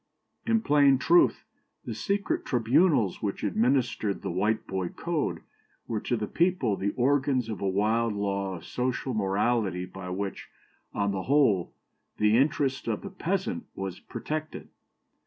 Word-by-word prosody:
"In 225 -1 +3
plain 145 -4 +5
truth, 340 - +3 0.4
the - - -4
secret 200 -1 -1
tribunals 120 - +2
which 100 -2 -3
administered 110 -1 +1
the - - -2
Whiteboy 95 -1 -1
code 170 -3 -2 0.5
were 110 -2 -1
to 120 - -1
the 110 - -2
people 170 - +1
the 100 +1 -1
organs 135 -2 +1
of 105 -5 -5
a 100 - +1
wild 110 +4 +1
law 100 -1 -2
of 85 - -10
social 125 +1 -2
morality 100 -2 0
by 90 0 -8
which, 95 +2 -4 0.4
on 100 -1 0
the 95 -1 -3
whole, 130 - +3 0.5
the 105 +1 +3
interest 135 0 +1
of - - -2
the 200 - -7
peasant 195 +7 -2
was 95 -2 -5
protected. 155 0 -5
115 Hz, 140 wpm, -28 LUFS, 100-145 Hz, 0.5 s, plain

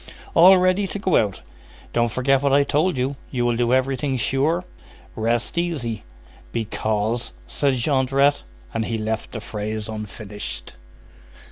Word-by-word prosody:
"All 185 +3 +8
ready 185 +2 +2
to 205 - -5
go 190 -4 +1
out." 100 - +1 0.5
"Don't 120 0 +2
forget 130 +4 +2
what 140 -1 +2
I 140 +1 +5
told 155 +4 +1
you. 130 +3 -1
You 120 -2 -1
will 120 -1 +2
do 120 0 +1
everything 130 +1 +1
sure?" 150 +9 +1 0.5
"Rest 115 +7 0
easy." 140 -11 -2 0.5
"Because—" 110 0 -1
said 140 -2 0
Jondrette. 135 +2 +2 0.3
And 115 - -1
he 115 - -2
left 110 0 -3
the 115 - -5
phrase 105 0 -4
unfinished. 105 -1 -6
125 Hz, 140 wpm, -23 LUFS, 110-145 Hz, 0.5 s, All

